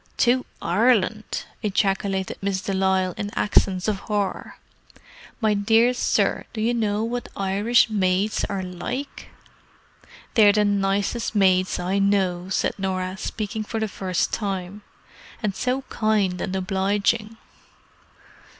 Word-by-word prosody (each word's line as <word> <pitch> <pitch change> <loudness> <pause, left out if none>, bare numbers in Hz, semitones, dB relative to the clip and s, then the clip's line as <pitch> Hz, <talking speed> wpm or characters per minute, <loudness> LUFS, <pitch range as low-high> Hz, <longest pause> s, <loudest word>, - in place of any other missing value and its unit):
"To 250 +1 +2 0.2
Ireland!" 215 +2 +1 0.2
ejaculated 195 -2 0
Miss 195 -1 -1
de 195 - -3
Lisle 190 -1 +1
in 205 - -3
accents 185 -2 +2
of 210 -3 0
horror. 205 -2 -3 0.8
"My 220 -3 +2
dear 225 +4 +3
sir, 245 - +1
do 225 - -5
you 230 +3 +1
know 215 -2 0
what 240 +2 -3
Irish 200 +6 +3
maids 200 -1 0
are 195 -2 -2
like?" 215 +10 -5 1.1
"They're 210 -3 +6
the 210 0 +3
nicest 200 +3 0
maids 185 -2 +3
I 185 +3 -1
know," 190 -3 +1
said 190 - 0
Norah, 185 -1 -2
speaking 215 +2 -4
for 225 +1 -4
the 220 - 0
first 185 -3 -2
time. 195 -1 -3 0.6
"And 210 -2 0
so 255 +2 -1
kind 210 -7 0
and 190 - -3
obliging." 200 +4 0
200 Hz, 125 wpm, -23 LUFS, 190-220 Hz, 1.1 s, They're